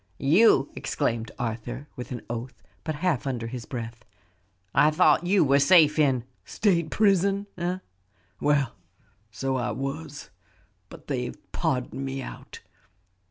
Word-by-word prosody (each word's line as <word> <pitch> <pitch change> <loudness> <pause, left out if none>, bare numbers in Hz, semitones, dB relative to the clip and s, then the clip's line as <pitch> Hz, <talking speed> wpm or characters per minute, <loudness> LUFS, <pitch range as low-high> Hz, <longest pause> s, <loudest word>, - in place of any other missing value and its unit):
"You!" 160 0 +4
exclaimed 115 -5 -2
Arthur, 120 +4 -4
with 125 - -7
an 120 - -5
oath, 120 +2 -6 0.2
but 155 - -3
half 150 -7 +1
under 120 -4 -2
his 120 0 -6
breath. 115 -3 -6 0.7
"I 150 - +5
thought 175 +2 +3
you 195 0 +4
were 140 -1 +4
safe 155 0 +6
in 135 -5 +3
" - - -42
"State 170 -6 +2
prison, 200 0 +2
eh? 180 +1 -2 0.6
Well, 140 -4 +2 0.6
so 130 +5 -2
I 120 - -1
was, 145 - -5 0.6
but - - -13
they've 125 -3 -3
pardoned 135 -4 -2
me 135 0 -3
out. 130 - -9
135 Hz, 135 wpm, -26 LUFS, 125-160 Hz, 0.7 s, safe